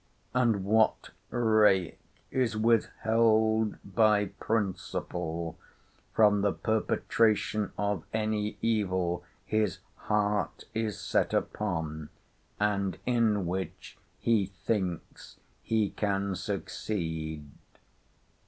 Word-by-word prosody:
—And 115 -6 +2
what 110 +2 +2 0.2
rake 110 -6 +3 0.3
is 125 -4 0
withheld 110 -1 +2
by 105 0 +3
principle 90 -5 -2 0.5
from 105 -2 +4
the 100 0 +2
perpetration 110 -1 +1
of 100 -5 -1
any 105 -1 -1
evil 95 -6 0 0.2
his 105 -5 0 0.3
heart 105 -4 0
is 110 -2 -2
set - - +1
upon, 80 -7 -2 0.5
and 100 -4 0
in 110 -5 +2
which 90 0 -5 0.2
he 110 -5 +2
thinks 95 -2 -4 0.2
he 110 -3 +1
can 100 -2 -1
succeed? 80 -5 -4
105 Hz, 85 wpm, -29 LUFS, 95-110 Hz, 0.5 s, from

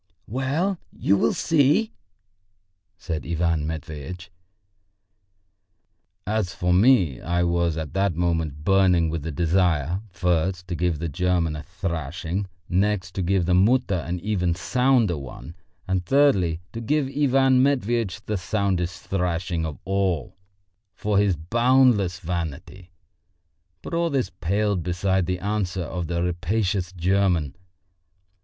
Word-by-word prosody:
"Well, 145 - -1
you 100 - +1
will 115 +4 +1
see!" 160 - +2 1.0
said 80 -4 -4
Ivan 85 -2 0
Matveitch. 80 +3 -7 1.9
As 105 -4 -1
for 90 0 +1
me, 95 - +4
I 85 0 0
was 85 -1 +1
at 80 -1 -5
that 95 -2 +1
moment 80 -4 -1
burning 90 -3 +3
with 80 -1 -3
the 80 +3 -4
desire, 85 +1 +1
first, 90 +1 -1
to 90 - -2
give 85 -2 0
the 85 +3 -3
German 85 0 0
a 75 - -5
thrashing, 85 +1 -4 0.2
next, 95 +1 0
to 95 - -3
give 95 0 +1
the 90 - +1
Mutter 110 +4 +3
an 90 0 -2
even 90 -4 0
sounder 115 - +2
one, 70 +4 -9 0.3
and, 95 -1 0
thirdly, 95 - +3
to 115 - -5
give 145 +5 +1
Ivan 135 -2 +3
Matveitch 120 -6 0
the 105 - -1
soundest 90 -2 -1
thrashing 90 -3 -1
of 75 - -7
all 95 -4 -1 0.6
for 105 0 +1
his 100 -3 +2
boundless 115 - +3
vanity. 85 +1 -5 0.9
But - - -7
all 170 0 +1
this 135 -4 -1
paled 100 +3 0
beside 90 +2 0
the 90 0 -1
answer 95 -1 -2
of 85 +1 -4
the 85 0 -1
rapacious 90 +1 -1
German. 90 -4 +1
90 Hz, 130 wpm, -24 LUFS, 85-105 Hz, 1.9 s, me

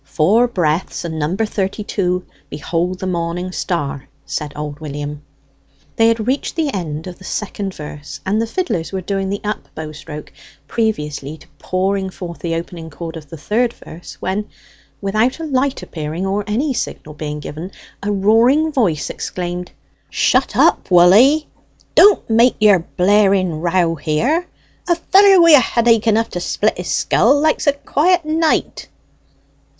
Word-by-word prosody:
"Four 170 - +2
breaths, 175 -6 -1
and 160 -1 -4
number 180 +9 0
thirty 205 0 -3
two, 180 -3 -1 0.2
'Behold 175 +5 -2
the 190 - -5
Morning 175 0 -2
Star,'" 145 -7 -3 0.2
said 150 -1 -4
old 150 0 -6
William. 145 -1 -6 0.7
They 225 - +4
had 230 -1 +1
reached 265 +4 -1
the 310 -4 -1
end 160 -4 -4
of 180 -1 -9
the - - -14
second 195 0 -4
verse, 150 -1 -8
and 205 +4 +1
the 230 - -1
fiddlers 230 - -2
were 190 -1 -3
doing 195 +1 -2
the 200 +1 -3
up 210 0 -4
bow 155 -1 -6
stroke 150 0 -9 0.3
previously 150 - -2
to - - -18
pouring 190 +1 -1
forth 175 -2 -8
the 165 -1 -2
opening 165 0 -6
chord 165 +2 -7
of 150 -3 -10
the 165 - -8
third 230 +9 0
verse, 170 +2 -12
when, 205 +3 -3 0.5
without 215 +8 0
a - - -5
light 275 -2 -1
appearing 160 +3 -5
or 200 +2 -1
any 260 +7 0
signal 155 -9 -5
being 150 0 -5
given, 155 +4 -7 0.3
a 205 +1 -2
roaring 230 +10 +3
voice 180 - 0
exclaimed 180 0 -5 0.4
"Shut - - +1
up, - - +3
woll 180 0 +7
'ee! 280 +8 +5 0.5
Don't 410 0 +6
make 235 +2 +4
your 210 -3 +5
blaring 185 -2 +2
row 170 -1 +1
here! 200 - 0 0.4
A 345 - +4
feller 385 +3 +5
wi' 335 -1 +7
a 295 - +9
headache 230 -2 +2
enough 225 +1 +2
to 175 - -3
split 210 +4 0
his 180 - -5
skull 275 +5 +3
likes 310 0 +1
a 285 - +5
quiet 330 +4 +1
night!" 315 +1 0
190 Hz, 160 wpm, -18 LUFS, 165-230 Hz, 0.7 s, a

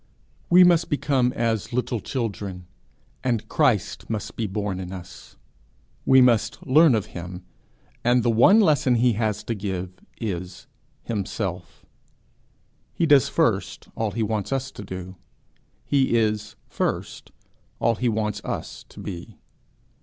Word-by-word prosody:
We 180 +1 +8
must 170 -2 +4
become 135 -4 +1
as 115 -4 -1
little 125 -1 -1
children, 100 -6 -4 0.6
and 120 -4 -1
Christ 130 - 0
must 110 -2 -4
be 115 - -2
born 100 -1 -3
in 90 -1 -6
us; 95 -1 -10 0.7
we 130 0 +7
must 120 -2 +2
learn 145 0 +6
of 105 - -1
him, 90 +1 -7 0.6
and 120 0 +3
the 120 - +3
one 155 - +6
lesson 145 - +3
he 120 0 +3
has 105 -1 -1
to 115 - -2
give 95 -3 -4 0.3
is 90 -4 -5 0.4
himself: 95 -5 -4 1.1
he 170 - +1
does 145 -6 +5
first - - 0
all 110 -1 -1
he 110 +3 -2
wants 105 +1 -2
us 135 0 -2
to 105 - -9
do; 95 -1 -8 0.7
he 135 -4 +2
is 110 -1 -1
first - - -3 0.5
all 115 - +2
he 120 +2 0
wants 105 -1 -2
us - - -5
to - - -13
be. 90 -4 -8
110 Hz, 140 wpm, -24 LUFS, 95-125 Hz, 1.1 s, We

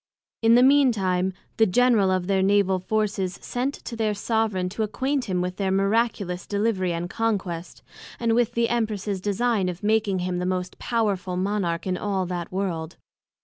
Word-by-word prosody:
In 225 0 +5
the 245 - +6
mean 275 -1 +6
time, 185 -3 0 0.3
the 220 - +5
General 225 -1 +3
of 185 -1 +1
all - - -8
their 195 -1 +2
Naval 195 -1 +3
Forces, 195 -1 -1
sent 260 +3 -2
to 235 - -5
their 215 -2 0
soveraign 215 -4 0
to 205 +4 -5
acquaint 260 +5 -1
him 185 -3 -1
with 180 0 -3
their 195 -2 0
miraculous 195 -2 0
Delivery 200 -3 0
and 170 +1 -3
Conquest, 190 -5 -3 0.4
and 230 -1 +1
with 235 -1 +2
the 235 0 +2
Empress's 215 -4 -1
design 205 -1 +1
of 180 +1 -7
making 210 -2 +2
him 180 -1 -2
the 180 - -2
most 185 0 -3
powerful 200 -6 -1
Monarch 185 -3 -1
of 185 -1 -1
all 195 -2 -1
that 175 -1 -4
World. 175 -4 -3
200 Hz, 180 wpm, -24 LUFS, 185-225 Hz, 0.4 s, the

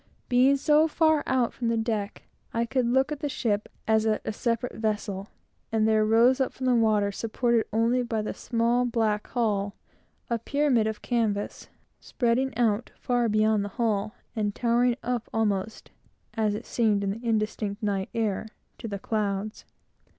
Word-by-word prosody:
Being 255 +3 +5
so 300 +3 +4
far 315 -1 +3
out 255 -3 +1
from 240 - -3
the 230 0 +1
deck, 220 -3 -2 0.3
I 230 0 +1
could 250 +1 0
look 265 +4 +2
at 300 - -3
the 290 - -2
ship, 215 -6 -1 0.2
as 220 0 +3
at 215 - 0
a - - -2
separate 235 +2 -1
vessel; 210 -3 -2 0.4
and 220 -1 +2
there 215 -1 +3
rose 235 +5 +4
up 265 - +1
from 260 - -5
the 255 - +4
water, 215 -3 +3
supported 230 +2 0
only 230 +3 +2
by 225 -3 -2
the - - -3
small 235 +1 +1
black 225 -4 0
hull, 205 -4 -1 0.5
a 235 -1 -1
pyramid 265 -3 +1
of 220 -1 -4
canvas, 220 -4 -1 0.3
spreading 255 +2 0
out 230 -1 +1
far 245 -3 0
beyond 215 -1 +2
the 205 - -4
hull, 215 -1 0 0.2
and 210 -2 -1
towering 240 0 +2
up 245 -2 -2
almost, 215 -2 -2 0.4
as 215 -2 0
it - - -6
seemed 215 -4 +1
in 195 - 0
the 225 +4 -7
indistinct 215 -1 -1
night 195 -2 -1
air, 220 -2 -1 0.3
to - - -5
the 200 -2 -4
clouds. 210 0 -3
225 Hz, 170 wpm, -27 LUFS, 215-245 Hz, 0.5 s, Being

